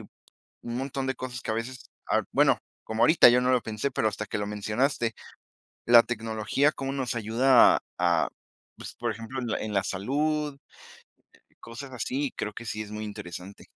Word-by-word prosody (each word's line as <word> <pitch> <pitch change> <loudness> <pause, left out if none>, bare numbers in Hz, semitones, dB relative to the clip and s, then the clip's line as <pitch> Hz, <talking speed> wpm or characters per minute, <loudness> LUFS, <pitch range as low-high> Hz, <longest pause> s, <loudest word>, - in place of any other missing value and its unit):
un - - -11 0.7
montón 135 0 -3
de 130 - -1
cosas 125 -1 -6
que - - -3
a - - 0
veces, 125 +3 -5 0.2
ah, - - +2
bueno, - - +4 0.3
como 110 +1 0
ahorita, 160 -1 +8
yo 125 +1 +4
no 125 +1 +2
lo 125 -2 +3
pensé, 110 +6 -3
pero 110 - +1
hasta 105 0 -3
que 105 - -4
lo 105 - -2
mencionaste, 115 +4 -1 0.7
la 120 0 +8
tecnología 115 +5 0
cómo 135 0 -4
nos 130 -3 -2
ayuda 120 +3 +5 0.2
a 85 -2 +2 0.5
pues, - - -9
por 120 -2 -2
ejemplo, 115 +4 -7
en 120 - -4
la 110 - -1
en 110 - -4
la 100 0 +2
salud. 145 +7 -1 1.1
Cosas 130 +4 -9
así, 130 +3 -2
creo 105 - -3
que 120 - -8
sí 110 -1 -3
es 105 - -10
muy 105 0 -5
interesante. 100 -2 -8
115 Hz, 185 wpm, -27 LUFS, 105-130 Hz, 1.1 s, ahorita